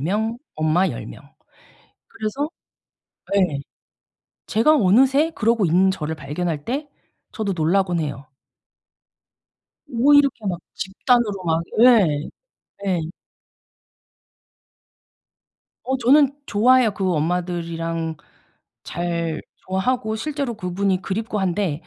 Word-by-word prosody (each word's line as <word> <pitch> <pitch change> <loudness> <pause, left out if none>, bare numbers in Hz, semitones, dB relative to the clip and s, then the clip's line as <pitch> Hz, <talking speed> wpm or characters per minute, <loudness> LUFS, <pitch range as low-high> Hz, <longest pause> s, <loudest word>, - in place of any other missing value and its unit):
명, 215 +9 -1 0.2
엄마 155 +5 +2
10 - - -6
명. - - -11 0.9
그래서 225 +7 -3 0.8
네. 185 -7 +2 0.9
제가 230 +9 +4
어느새 270 - +4
그러고 230 -4 +1
있는 180 +3 +3
저를 160 -4 -4
발견할 155 +1 -4
때 285 +5 -3 0.4
저도 205 -4 -2
놀라고는 175 +1 +1
해요. 140 -1 -6 1.6
뭐 265 +5 +3
이렇게 280 -6 +3
막 180 -3 -1 0.2
집단으로 205 0 0
막 165 0 +1 0.2
예. 200 -12 +5 0.6
예. 185 -3 +1 2.8
어 265 +1 0
저는 275 +3 +4
좋아해요. 240 +1 +4
그 195 -2 -1
엄마들이랑 165 0 -2 0.7
잘 170 -2 -3 0.3
좋아하고 220 +4 0
실제로 280 0 -3
그분이 190 -1 -1
그립고 215 +1 -3
한데 180 -4 -1
195 Hz, 200 characters per minute, -22 LUFS, 170-235 Hz, 2.8 s, 예